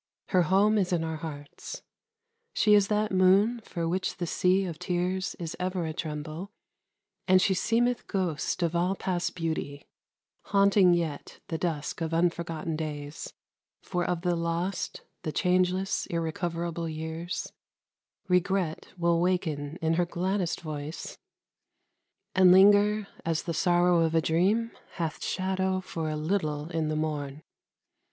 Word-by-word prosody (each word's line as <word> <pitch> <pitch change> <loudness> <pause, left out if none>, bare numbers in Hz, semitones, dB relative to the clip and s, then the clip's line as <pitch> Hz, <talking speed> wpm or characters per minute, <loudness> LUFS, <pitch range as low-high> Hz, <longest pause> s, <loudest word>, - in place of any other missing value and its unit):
Her 185 - +4
home 200 +5 +3
is 185 -2 0
in 170 -2 +1
our 160 -1 -3
hearts. 150 - -8 0.7
She 210 - +4
is 205 -1 +5
that 210 0 0
moon 195 +5 +4
for 170 -5 -3
which 185 +3 -1
the 175 - -2
sea 185 +3 +2
of 165 -3 -6
tears 180 +1 -1
Is 165 -2 -5
ever 185 -1 -1
a 160 - -3
tremble, 155 +3 -5 0.8
and 185 -1 +6
she 190 - +3
seemeth 235 +5 +1
ghost 185 -2 -1
Of 170 0 0
all 180 +3 +1
past 180 -2 -2
beauty, 160 -4 -3 0.6
haunting 200 -2 +5
yet 160 -4 -4
the 160 - -2
dusk 160 -2 -3
Of 165 0 -1
unforgotten 165 -2 -1
days; 150 -1 -5 0.5
for 180 -1 -1
of 175 -1 -1
the 175 -1 +1
lost, 170 +3 -2 0.2
The 155 - -3
changeless, 185 +4 +1
irrecoverable 170 0 -2
years, 160 +2 -5 0.7
Regret 180 -2 +1
will 170 -1 +2
waken 160 -4 -1
in 160 0 +2
her 175 +1 +2
gladdest 185 +1 -1
voice, 155 -1 -5
MUSIC. - - -13 1.1
And 185 -1 +6
linger, 205 +2 +6 0.2
as 165 -1 -1
the 170 - -3
sorrow 175 +1 +3
of 165 0 +2
a - - +6
dream 200 +9 +2 0.2
Hath 165 -3 -3
shadow 190 0 0
for 165 -4 -4
a 155 - -2
little 155 -2 -1
in 160 -2 -1
the 155 - -1
morn. 150 -2 -3
175 Hz, 145 wpm, -28 LUFS, 160-185 Hz, 1.1 s, and